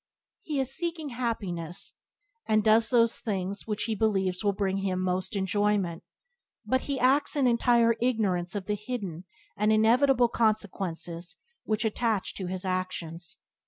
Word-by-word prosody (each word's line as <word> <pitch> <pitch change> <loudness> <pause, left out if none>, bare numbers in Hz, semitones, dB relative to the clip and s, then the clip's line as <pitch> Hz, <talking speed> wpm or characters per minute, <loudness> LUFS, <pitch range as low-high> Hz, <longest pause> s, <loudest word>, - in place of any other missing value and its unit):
He 300 -3 -3
is 265 0 +1
seeking 335 -3 -3
happiness, 200 -9 -3 0.5
and 215 -1 +3
does 220 +1 +5
those 230 -2 +3
things 200 -1 -3
which 210 -1 -1
he 225 - -1
believes 195 -3 0
will 205 - +3
bring 195 -1 -1
him 190 -2 -1
most 185 +3 -1
enjoyment, 200 -3 0 0.6
but 260 0 +1
he 280 -2 -3
acts 270 +5 +3
in 280 -3 +2
entire 235 -1 +4
ignorance 200 -7 0
of 200 -2 -3
the 210 - -1
hidden 200 -6 -5 0.3
and 210 +1 +2
inevitable 240 +4 +4
consequences 190 -6 -1 0.3
which 215 +1 0
attach 220 -2 0
to 185 - -5
his 185 +1 -4
actions. 185 -2 -3
210 Hz, 145 wpm, -28 LUFS, 185-235 Hz, 0.6 s, does